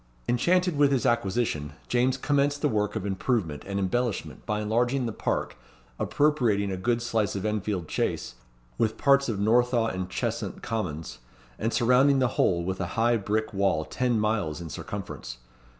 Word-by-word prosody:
Enchanted 175 +6 +2
with 145 -1 +5
his 130 -5 +1
acquisition, 100 -10 0
James 125 +2 +2
commenced 145 +1 +1
the - - +5
work 105 -5 0
of 105 -3 -3
improvement 95 - -1
and 100 0 -3
embellishment 110 +4 -2
by 105 0 0
enlarging 120 +5 +1
the 115 - -2
park, - - -2 0.4
appropriating 120 -10 +2
a - - -1
good 115 +5 0
slice 115 -4 0
of 95 - -3
Enfield 105 -5 -2
Chace, - - -2 0.5
with 110 0 +1
parts 140 -1 +4
of 110 - -1
Northaw 115 +2 +2
and 95 0 -4
Cheshunt - - -3
Commons, 80 - -4 0.4
and 115 - 0
surrounding 125 +4 +4
the 130 -2 +2
whole 85 -5 +1
with 95 +2 -3
a 90 - -1
high 120 +1 +4
brick 110 +1 -1
wall 95 -6 +1
ten 125 -3 0
miles 105 -8 0
in 85 -3 -7
circumference. 80 -13 -6
110 Hz, 165 wpm, -27 LUFS, 95-125 Hz, 0.5 s, with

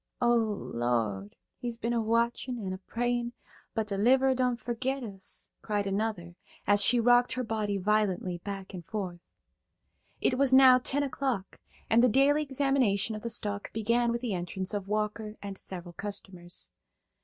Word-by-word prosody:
"O 240 -1 +4
Lord, 120 - -1 0.3
we's 240 -2 -3
been 235 +1 -2
a 235 - +1
watchin' 235 +3 0
an' 190 -4 -4
a 185 - -6
prayin', 240 +3 -2 0.4
but 220 - 0
de 200 -2 -3
'liverer 260 +4 +4
done 250 -1 +1
fergit 245 +3 -3
us!" 195 -4 -9
cried 205 -2 -1
another, 195 -3 -2 0.3
as 205 0 +5
she 245 +4 +4
rocked 245 +1 +4
her 255 - -2
body 215 -3 -1
violently 195 -3 0
back 195 +1 -7
and 180 -2 -7
forth. 185 -2 -5 1.0
It 255 - +1
was 270 -2 +5
now 260 -1 +8
ten 280 +3 +1
o' 280 - -2
clock, 255 -8 -3 0.3
and 225 +1 +4
the 250 - +6
daily 280 +5 +4
examination 265 -7 +1
of 215 - -6
the 235 - -4
stock 205 -3 -1
began 235 +2 +1
with 235 0 -2
the 240 -5 -2
entrance 185 +2 -3
of 200 -2 -3
Walker 210 +1 -2
and 200 -1 -6
several 175 -2 -6
customers. 185 -2 -5
220 Hz, 165 wpm, -29 LUFS, 195-245 Hz, 1.0 s, now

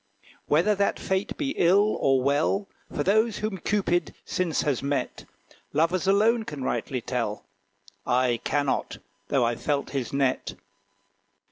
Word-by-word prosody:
Whether 170 +8 +3
that 200 0 +1
fate 190 +1 -2
be 280 -3 -1
ill 200 +5 +4
or 135 -1 +3
well 155 +9 +1 0.2
For 145 - -1
those 220 +4 +2
whom 210 -3 -3
Cupid 175 -2 0
since 175 -4 -1
has 140 -5 0
met, 140 +1 -2 0.5
Lovers 165 +5 +1
alone 220 +4 +3
can 150 -9 -6
rightly 130 -1 -2
tell: 115 -3 -3 0.6
I 125 -1 +1
cannot, 145 -2 -1 0.3
though 130 -4 +2
I've 115 0 -2
felt 145 -1 -1
his 135 -4 -3
net. 135 -2 0
155 Hz, 135 wpm, -26 LUFS, 135-200 Hz, 0.6 s, ill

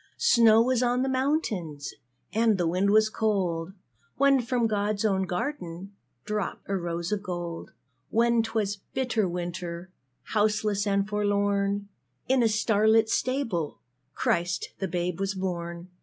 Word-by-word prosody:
Snow 230 -1 +5
was 255 0 +1
on 245 +1 +2
the - - 0
mountains, 245 - -1 0.4
And 220 -1 +3
the 175 - 0
wind 185 +4 +1
was 215 +1 +5
cold, 190 -6 -1 0.4
When 275 -1 +4
from 240 0 0
God's 210 0 0
own 190 -2 +1
garden 180 - -4 0.3
Dropped 210 -1 -3
a 195 - -1
rose 170 0 -3
of 210 -1 0
gold. 175 -3 -5 0.4
When 235 +1 +3
'twas 215 -3 -1 0.2
bitter 235 -7 +1
winter, 175 0 -5 0.4
Houseless 210 -1 +1
and 200 0 +1
forlorn 205 -1 0 0.4
In 260 0 +3
a 230 - +4
star 215 -1 +2
lit 220 0 +5
stable 230 - -1 0.4
Christ 175 +1 0
the 195 - -1
Babe 175 0 -2
was 195 0 -1
born. 175 -1 -4
205 Hz, 140 wpm, -27 LUFS, 180-225 Hz, 0.4 s, Snow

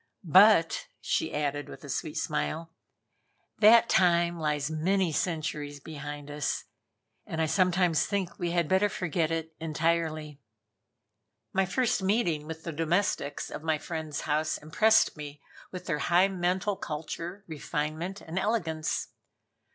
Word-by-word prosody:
But," 185 0 +5
she 160 - -1
added, 145 0 -2
with - - -11
a - - -9
sweet 150 +4 -3
smile, 160 +2 -2 0.9
"that 225 +2 +7
time 170 -2 +3
lies 150 -1 -1
many 180 +3 +1
centuries 155 -3 -2
behind 145 -1 -7
us, 145 -1 -2 0.6
and 160 - -4
I 160 - +3
sometimes 180 -2 +2
think 195 -3 -2
we 175 -2 -1
had 170 -2 +1
better 190 +4 +3
forget 175 -5 -1
it 165 0 -3
entirely." 155 -2 -1 1.1
My 190 0 +2
first 245 +1 +1
meeting 190 -7 +1
with 160 0 -7
the 165 - -4
domestics 165 -2 -1
of - - -6
my 160 -1 +1
friend's 155 -2 -5
house 155 +1 0
impressed 215 +9 +3
me 145 -1 -8 0.3
with 180 -1 -7
their 150 -4 -1
high 180 +3 +4
mental 185 +2 0
culture, 165 +5 -6
refinement 155 +4 -4
and 165 +4 -4
elegance. 170 -7 -1
165 Hz, 135 wpm, -29 LUFS, 150-185 Hz, 1.1 s, that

